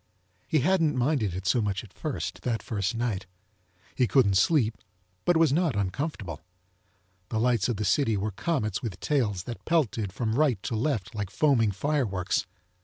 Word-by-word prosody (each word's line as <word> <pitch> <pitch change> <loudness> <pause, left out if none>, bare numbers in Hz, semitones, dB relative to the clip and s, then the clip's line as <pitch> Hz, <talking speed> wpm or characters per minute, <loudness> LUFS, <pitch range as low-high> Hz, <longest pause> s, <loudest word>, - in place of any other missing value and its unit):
He 155 - +2
hadn't 165 -2 +2
minded 120 - +1
it 95 +1 -5
so 115 +6 +3
much 100 -1 -1
at 100 - -15
first, 155 -4 -4
that 115 -3 -2
first 105 0 -2
nite. 110 -6 -2 0.7
He 125 - +2
couldn't 120 -7 +4
sleep, 115 - +3 0.5
but 175 - +4
it - - +4
was 160 -4 +4
not 165 - +2
uncomfortable. 100 - -3 0.9
The 110 - -1
lites 120 -2 +2
of 120 - 0
the 105 +1 -2
city 110 +2 +2
were 105 +2 -2
comets 110 - -1
with 110 -9 -5
tails 110 -11 0
that 120 +2 -7
pelted 120 - 0
from 110 +2 -2
rite 130 -7 +2
to 115 - -2
left 115 -3 -1
like 105 -3 -3
foaming 115 -1 +3
fireworks. 100 - 0
115 Hz, 175 wpm, -27 LUFS, 100-145 Hz, 0.9 s, couldn't